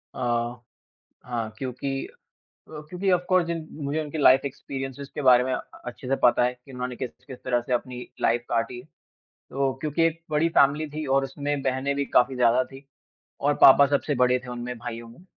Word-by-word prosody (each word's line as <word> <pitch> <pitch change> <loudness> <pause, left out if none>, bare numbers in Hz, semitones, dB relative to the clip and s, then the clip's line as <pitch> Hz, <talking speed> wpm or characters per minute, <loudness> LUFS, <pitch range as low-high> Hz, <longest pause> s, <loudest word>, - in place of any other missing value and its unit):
अ, - - -7 1.1
हाँ, 115 -3 -4
क्योंकि 135 +1 -4 0.6
अ, - - -18 0.2
क्योंकि 185 +2 -2
ऑफ़ 180 -1 +2
कोर्स 185 -2 +4
जिन 165 -2 -4 0.2
मुझे 145 +3 -1
उनकी 155 +1 -6
लाइफ 135 -2 +6
एक्सपीरियंसेज़ 135 0 -6
के 150 - -3
बारे 125 -2 +6
में 130 - -2
अ - - 0 0.3
अच्छे 125 +1 -8
से 135 - +2
पता 120 0 +5
है 125 0 +1
कि 125 +2 -18
उन्होंने 125 0 -5
किस-किस 130 +1 -8
तरह 120 -1 +1
से 125 - -3
अपनी 125 0 -2 0.2
लाइफ 120 +1 +2
काटी। 120 +1 -1 0.7
तो 135 0 0
क्योंकि 155 +1 -1
एक 165 0 0
बड़ी 155 +2 +2
फैमिली 145 +3 +4
थी 155 +1 -5
और 135 - +3
उसमें 140 +1 -3
बहनें 135 +1 -1
भी 140 0 -1
काफ़ी 130 +1 +3
ज़्यादा 125 +1 +3
थी 135 +1 -13 0.6
और 145 +1 +2
पापा 140 +1 +9
सबसे 145 +1 0
बड़े 125 0 +3
थे, 125 0 -11
उनमें 125 0 -5
भाइयों 115 0 -7
में। 125 +11 -17
135 Hz, 190 wpm, -25 LUFS, 125-145 Hz, 1.1 s, पापा